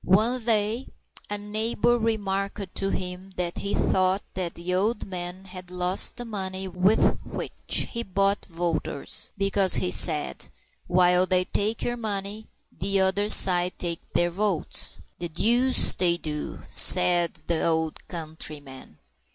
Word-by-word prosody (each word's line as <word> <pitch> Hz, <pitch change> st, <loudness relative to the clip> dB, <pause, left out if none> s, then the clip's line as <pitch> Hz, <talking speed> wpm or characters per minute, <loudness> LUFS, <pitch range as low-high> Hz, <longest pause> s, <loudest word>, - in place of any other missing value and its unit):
One 225 Hz, +6 st, +2 dB
day 220 Hz, +2 st, 0 dB, 0.4 s
a 205 Hz, -, -2 dB
neighbor 220 Hz, +3 st, 0 dB
remarked 200 Hz, -3 st, -2 dB
to 195 Hz, -, -1 dB
him 185 Hz, +1 st, -5 dB
that 175 Hz, -1 st, -2 dB
he 200 Hz, -, -1 dB
thought 185 Hz, +1 st, +1 dB
that 180 Hz, -2 st, -1 dB
the 175 Hz, +2 st, -4 dB
old 210 Hz, +5 st, 0 dB
man 185 Hz, 0 st, -6 dB
had 185 Hz, -1 st, -7 dB
lost 180 Hz, +1 st, +1 dB
the 245 Hz, -, -5 dB
money 190 Hz, -3 st, -4 dB
with 185 Hz, +4 st, +2 dB
which -, -, -2 dB
he 235 Hz, -, -2 dB
bought 200 Hz, -1 st, 0 dB
voters, 165 Hz, -5 st, -2 dB
because, 195 Hz, -1 st, +4 dB
he 180 Hz, -, +2 dB
said, 155 Hz, -4 st, +2 dB, 0.4 s
while 180 Hz, 0 st, +3 dB
they 185 Hz, 0 st, +2 dB
take 215 Hz, +4 st, -1 dB
your 240 Hz, 0 st, -2 dB
money, 210 Hz, -1 st, -3 dB, 0.2 s
the 195 Hz, +2 st, -1 dB
other 190 Hz, +2 st, +1 dB
side 180 Hz, -3 st, +5 dB
take 170 Hz, -2 st, -3 dB
their 175 Hz, 0 st, +2 dB
votes. 195 Hz, -2 st, -1 dB, 0.2 s
"The 175 Hz, 0 st, -4 dB
deuce 240 Hz, +10 st, +3 dB
they 175 Hz, -2 st, +2 dB
do!" 150 Hz, -3 st, -6 dB
said 175 Hz, -2 st, +4 dB
the 165 Hz, -2 st, 0 dB
old 160 Hz, -1 st, -1 dB
countryman. 150 Hz, -, -6 dB
190 Hz, 140 wpm, -25 LUFS, 175-205 Hz, 0.4 s, side